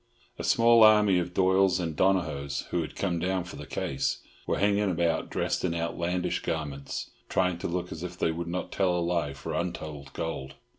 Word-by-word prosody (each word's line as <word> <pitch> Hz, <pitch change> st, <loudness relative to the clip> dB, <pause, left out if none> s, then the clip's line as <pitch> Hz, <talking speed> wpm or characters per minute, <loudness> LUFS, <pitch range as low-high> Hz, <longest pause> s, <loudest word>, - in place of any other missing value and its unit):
A -, -, -3 dB
small 115 Hz, -2 st, +5 dB
army 105 Hz, -3 st, +6 dB
of 90 Hz, +1 st, -4 dB
Doyles 95 Hz, 0 st, +4 dB
and 80 Hz, -3 st, -2 dB
Donohoes, 75 Hz, -7 st, +1 dB
who 85 Hz, -, +1 dB
had 80 Hz, -, -6 dB
come 90 Hz, -4 st, -1 dB
down 90 Hz, +1 st, 0 dB
for 90 Hz, -, -9 dB
the -, -, -8 dB
case, 70 Hz, +1 st, -2 dB, 0.3 s
were -, -, +1 dB
hanging 100 Hz, 0 st, +2 dB
about 85 Hz, -2 st, 0 dB
dressed -, -, -1 dB
in 85 Hz, -2 st, 0 dB
outlandish 85 Hz, +2 st, -1 dB
garments, 70 Hz, -4 st, -4 dB, 0.2 s
trying 90 Hz, -2 st, +1 dB
to -, -, -2 dB
look 90 Hz, +1 st, -3 dB
as 80 Hz, -, -6 dB
if 90 Hz, 0 st, -6 dB
they 80 Hz, -, +1 dB
would 85 Hz, +1 st, -4 dB
not 90 Hz, +2 st, -3 dB
tell 95 Hz, -3 st, +1 dB
a -, -, +1 dB
lie 85 Hz, -4 st, 0 dB
for 70 Hz, -, -6 dB
untold 75 Hz, -5 st, -4 dB
gold. 70 Hz, -5 st, -4 dB
85 Hz, 195 wpm, -28 LUFS, 80-95 Hz, 0.3 s, army